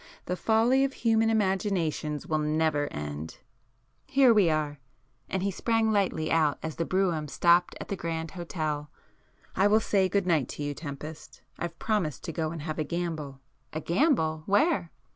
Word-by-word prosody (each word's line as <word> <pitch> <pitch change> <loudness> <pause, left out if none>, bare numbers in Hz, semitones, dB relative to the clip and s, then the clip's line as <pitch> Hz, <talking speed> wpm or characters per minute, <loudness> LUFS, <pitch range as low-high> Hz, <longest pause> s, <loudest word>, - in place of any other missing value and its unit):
The 180 - -2
folly 230 +7 +3
of 275 0 0
human 225 -2 +2
imaginations 190 -8 0
will 155 -1 0
never 150 -1 +1
end! 75 +2 -6 0.7
Here 265 -3 +5
we 205 -6 +4
are!"—and 145 +2 -4
he 200 - 0
sprang 225 +3 +1
lightly 190 -6 0
out 155 -3 +3
as 160 -1 -4
the 165 - 0
brougham 175 -5 0
stopped 175 +4 +3
at - - -8
the 200 - -1
Grand 165 -2 -4
Hotel—"I 160 +2 -4
will 215 +1 +5
say 195 -3 +1
good 200 0 +1
night 160 -8 +2
to 150 - -4
you, 145 0 -2
Tempest. 150 +1 -8 0.2
I've 170 -1 -4
promised 195 - -1
to 170 - -4
go 160 -1 -1
and 160 -2 -6
have 155 0 -4
a - - +1
gamble." 155 -5 -4 0.3
"A 155 - -2
gamble? 165 - +1
Where?" 245 - +2
165 Hz, 160 wpm, -28 LUFS, 155-200 Hz, 0.7 s, Here